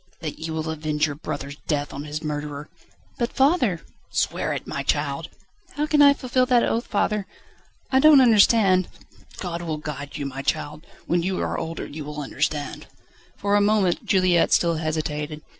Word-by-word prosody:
"That 155 Hz, -2 st, -5 dB
you 160 Hz, 0 st, -4 dB
will 160 Hz, 0 st, -3 dB
avenge 155 Hz, -1 st, 0 dB
your 145 Hz, -, -3 dB
brother's 145 Hz, -1 st, -6 dB
death 145 Hz, -2 st, -1 dB
on 140 Hz, +2 st, -6 dB
his 150 Hz, +1 st, -5 dB
murderer?" 150 Hz, -1 st, -5 dB, 0.5 s
"But, 235 Hz, -1 st, 0 dB
father 265 Hz, -, +2 dB, 0.2 s
..." -, -, -37 dB
"Swear -, -, -1 dB
it, -, -, -4 dB
my -, -, -4 dB
child!" -, -, -1 dB, 0.5 s
"How 295 Hz, +1 st, 0 dB
can 305 Hz, -1 st, +3 dB
I 280 Hz, -1 st, +7 dB
fulfil 255 Hz, -1 st, 0 dB
that 245 Hz, -2 st, +4 dB
oath, 230 Hz, +2 st, -1 dB
father? 210 Hz, -1 st, 0 dB, 0.6 s
I 265 Hz, -, +4 dB
don't 300 Hz, 0 st, +8 dB
understand 210 Hz, -6 st, +5 dB, 0.3 s
..." -, -, -22 dB
"God 175 Hz, -2 st, -4 dB
will 160 Hz, -3 st, -3 dB
guide 145 Hz, -2 st, -6 dB
you, 145 Hz, -, -4 dB
my 135 Hz, 0 st, -5 dB
child. 150 Hz, +2 st, -3 dB, 0.2 s
When 175 Hz, 0 st, +1 dB
you 185 Hz, +2 st, -2 dB
are -, -, -2 dB
older 165 Hz, 0 st, -4 dB
you 150 Hz, +1 st, -7 dB
will 150 Hz, +1 st, -7 dB
understand." 145 Hz, +1 st, -3 dB, 0.5 s
For 205 Hz, 0 st, +1 dB
a 205 Hz, -, +4 dB
moment 205 Hz, -4 st, +2 dB
Juliette 185 Hz, -3 st, +3 dB
still 170 Hz, -2 st, +3 dB
hesitated. 155 Hz, -1 st, -3 dB
165 Hz, 180 wpm, -24 LUFS, 150-210 Hz, 0.6 s, don't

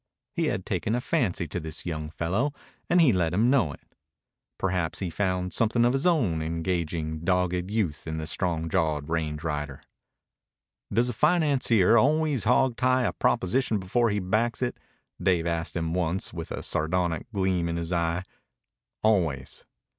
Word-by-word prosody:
He -, -, 0 dB
had -, -, -2 dB
taken 110 Hz, -, -1 dB
a -, -, 0 dB
fancy 95 Hz, -8 st, 0 dB
to 85 Hz, -, -4 dB
this 80 Hz, -2 st, -7 dB
young 80 Hz, -3 st, -4 dB
fellow, 100 Hz, -, -1 dB, 0.4 s
and 175 Hz, -, +4 dB
he 150 Hz, -9 st, +6 dB
let 85 Hz, -2 st, +1 dB
him 115 Hz, +5 st, +3 dB
know 115 Hz, -, +3 dB
it. -, -, -15 dB, 0.6 s
Perhaps 90 Hz, -4 st, -1 dB
he 95 Hz, -4 st, -3 dB
found 90 Hz, 0 st, -1 dB
something 115 Hz, +1 st, +2 dB
of 120 Hz, -, +3 dB
his 135 Hz, +6 st, +1 dB
own 115 Hz, -, +2 dB
engaging, 80 Hz, -1 st, -2 dB
dogged 90 Hz, +1 st, 0 dB
youth 95 Hz, -9 st, -2 dB
in 80 Hz, 0 st, -3 dB
the 80 Hz, -, -3 dB
strong 80 Hz, 0 st, -1 dB
jawed 80 Hz, -4 st, 0 dB
range 80 Hz, -2 st, -2 dB
rider. 75 Hz, -4 st, -3 dB, 1.1 s
"Does 120 Hz, +4 st, +2 dB
a -, -, -2 dB
financier 135 Hz, -, +3 dB
always 150 Hz, -1 st, +2 dB
hogtie 130 Hz, +1 st, +3 dB
a -, -, -2 dB
proposition 110 Hz, +4 st, +1 dB
before 115 Hz, +5 st, +1 dB
he 105 Hz, -, 0 dB
backs 110 Hz, +6 st, 0 dB
it?" 120 Hz, -, -2 dB, 0.4 s
Dave 85 Hz, -3 st, +2 dB
asked 85 Hz, 0 st, -2 dB
him 80 Hz, 0 st, -2 dB
once 90 Hz, +1 st, -1 dB
with 85 Hz, -1 st, -6 dB
a -, -, -4 dB
sardonic 85 Hz, +3 st, -1 dB
gleam 95 Hz, -4 st, 0 dB
in 85 Hz, -, -2 dB
his 85 Hz, +1 st, -3 dB
eye. 85 Hz, +1 st, 0 dB, 0.8 s
"Always." 85 Hz, -12 st, 0 dB
90 Hz, 160 wpm, -27 LUFS, 80-115 Hz, 1.1 s, he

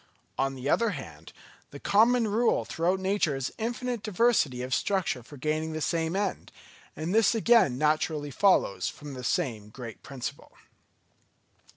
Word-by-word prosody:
On 135 Hz, 0 st, -1 dB
the 130 Hz, +1 st, -5 dB
other 230 Hz, +9 st, +3 dB
hand, -, -, -10 dB, 0.4 s
the -, -, -10 dB
common 230 Hz, +3 st, +3 dB
rule 225 Hz, +3 st, +1 dB
throughout 180 Hz, +3 st, 0 dB
nature 190 Hz, -6 st, +1 dB
is 135 Hz, -1 st, -3 dB
infinite 240 Hz, +1 st, -2 dB
diversity 205 Hz, -, +1 dB
of 130 Hz, +1 st, -3 dB
structure 190 Hz, -10 st, 0 dB
for 145 Hz, +5 st, -13 dB
gaining 155 Hz, +3 st, -2 dB
the 155 Hz, -, -3 dB
same 165 Hz, +2 st, -1 dB
end; 200 Hz, -1 st, -2 dB, 0.4 s
and 160 Hz, +4 st, -3 dB
this 225 Hz, +1 st, +4 dB
again 225 Hz, -, +4 dB
naturally 150 Hz, 0 st, 0 dB
follows 185 Hz, -, +2 dB
from 145 Hz, -1 st, -9 dB
the 130 Hz, -1 st, -7 dB
same 115 Hz, -, -1 dB
great 115 Hz, -1 st, -9 dB
principle. 135 Hz, -3 st, -7 dB
160 Hz, 150 wpm, -28 LUFS, 135-210 Hz, 0.4 s, this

